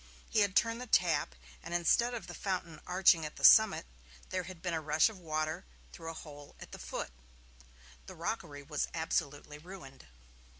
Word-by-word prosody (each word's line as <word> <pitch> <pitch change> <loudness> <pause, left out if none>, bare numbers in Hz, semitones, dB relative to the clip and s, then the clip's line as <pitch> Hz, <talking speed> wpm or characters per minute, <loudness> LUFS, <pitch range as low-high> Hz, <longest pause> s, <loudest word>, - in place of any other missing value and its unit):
He 220 - +3
had 200 -2 +2
turned 230 +1 +2
the 250 - -6
tap, 175 - +2 0.3
and 175 - -5
instead 235 +8 +2
of 220 -7 -6
the 175 - -8
fountain 180 -5 -4
arching 180 -2 +4
at 150 - -6
the - - -10
summit, 220 - +7 0.5
there 185 -1 -2
had 185 -1 -9
been 175 0 -3
a 160 - -1
rush 155 +5 +3
of 210 -4 -11
water 155 -2 -2 0.3
through 165 - -7
a - - -5
hole 145 -2 -11
at - - -11
the - - -9
foot. - - -5 1.0
The - - -9
rockery 145 -1 -4
was 150 0 -2
absolutely 150 -2 -2
ruined. 155 - -12
170 Hz, 180 wpm, -32 LUFS, 155-190 Hz, 1.0 s, summit